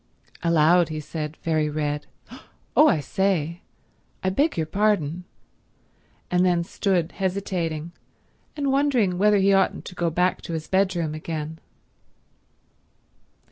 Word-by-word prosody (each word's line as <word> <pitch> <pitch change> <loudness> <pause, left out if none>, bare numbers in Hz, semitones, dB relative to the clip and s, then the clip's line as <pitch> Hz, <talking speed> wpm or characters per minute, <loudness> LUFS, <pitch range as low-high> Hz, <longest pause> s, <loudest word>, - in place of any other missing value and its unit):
Aloud 170 +1 +4
he 155 -1 -4
said, 150 0 -5
very 155 -2 +1
red, 150 -1 -2 0.7
"Oh 305 - +7
I 155 - +3
say—I 180 +1 -3
beg 290 - +1
your 160 - 0
pardon"—and 180 -3 0 1.2
then 175 -2 +2
stood 175 -1 0
hesitating, 180 -4 -2 0.7
and 280 -2 0
wondering 255 -10 +2
whether 210 +1 +4
he 195 0 +4
oughtn't 195 0 +1
to - - -8
go 175 -1 0
back 180 +3 +1
to 170 - -6
his 160 -1 -4
bedroom 185 -5 +1
again. 155 0 -5
175 Hz, 115 wpm, -24 LUFS, 155-195 Hz, 1.2 s, Oh